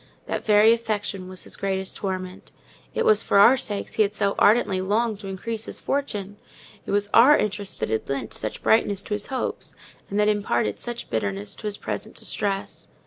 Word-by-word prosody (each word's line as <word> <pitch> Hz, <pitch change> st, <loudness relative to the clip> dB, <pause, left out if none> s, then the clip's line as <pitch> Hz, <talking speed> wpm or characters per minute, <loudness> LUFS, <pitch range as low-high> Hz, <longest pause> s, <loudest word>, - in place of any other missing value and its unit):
That -, -, -3 dB
very 215 Hz, +1 st, +6 dB
affection 205 Hz, -5 st, -3 dB
was 185 Hz, 0 st, -4 dB
his -, -, -6 dB
greatest 190 Hz, -1 st, -2 dB
torment: 185 Hz, -1 st, -5 dB, 0.4 s
it -, -, +1 dB
was 215 Hz, 0 st, +5 dB
for -, -, +1 dB
our 230 Hz, +6 st, +8 dB
sakes 205 Hz, -6 st, -4 dB
he -, -, +1 dB
had 210 Hz, 0 st, +1 dB
so 200 Hz, -1 st, +1 dB
ardently 205 Hz, -4 st, +4 dB
longed 210 Hz, +2 st, 0 dB
to 200 Hz, -, -8 dB
increase 220 Hz, +4 st, -4 dB
his -, -, -4 dB
fortune—it 205 Hz, -6 st, -5 dB
was 205 Hz, 0 st, +1 dB
our 270 Hz, +6 st, +8 dB
interest 205 Hz, -1 st, -3 dB
that -, -, -1 dB
had 110 Hz, +3 st, -2 dB
lent 135 Hz, -5 st, -3 dB
such 110 Hz, -, -4 dB
brightness 205 Hz, -3 st, +3 dB
to 210 Hz, -, -4 dB
his 205 Hz, 0 st, -2 dB
hopes, 265 Hz, -2 st, -4 dB, 0.3 s
and 200 Hz, -, -1 dB
that 210 Hz, -, +4 dB
imparted 120 Hz, -, 0 dB
such 240 Hz, 0 st, -6 dB
bitterness 100 Hz, -2 st, -2 dB
to 215 Hz, -, -6 dB
his 205 Hz, -1 st, -3 dB
present -, -, -5 dB
distress. 195 Hz, -2 st, -3 dB
205 Hz, 190 wpm, -24 LUFS, 190-215 Hz, 0.4 s, our